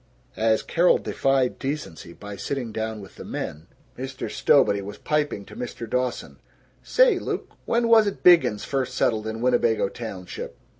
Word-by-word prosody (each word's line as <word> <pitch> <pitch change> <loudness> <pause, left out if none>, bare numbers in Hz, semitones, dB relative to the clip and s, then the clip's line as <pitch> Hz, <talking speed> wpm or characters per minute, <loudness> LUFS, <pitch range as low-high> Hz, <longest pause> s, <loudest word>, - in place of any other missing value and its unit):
As 110 0 +2
Carol 175 +1 +3
defied 135 -2 0
decency 135 - -5
by 105 +3 -9
sitting 125 +1 -4
down 110 0 -4
with 95 - -13
the - - -8
men, 75 +2 -6 0.3
Mr. 130 +1 -5
Stowbody 100 0 +3
was 100 +1 -8
piping 150 -9 -1
to - - -13
Mr. 120 -1 -6
Dawson, 125 +1 -2 0.4
"Say, - - +4
Luke, - - -4
when 235 0 +1
was't 220 -3 +4
Biggins 170 - +5
first 135 -2 -2
settled 110 -4 +1
in 110 +1 -4
Winnebago 120 -4 +2
Township? 100 -6 -7
120 Hz, 150 wpm, -24 LUFS, 105-140 Hz, 0.4 s, Biggins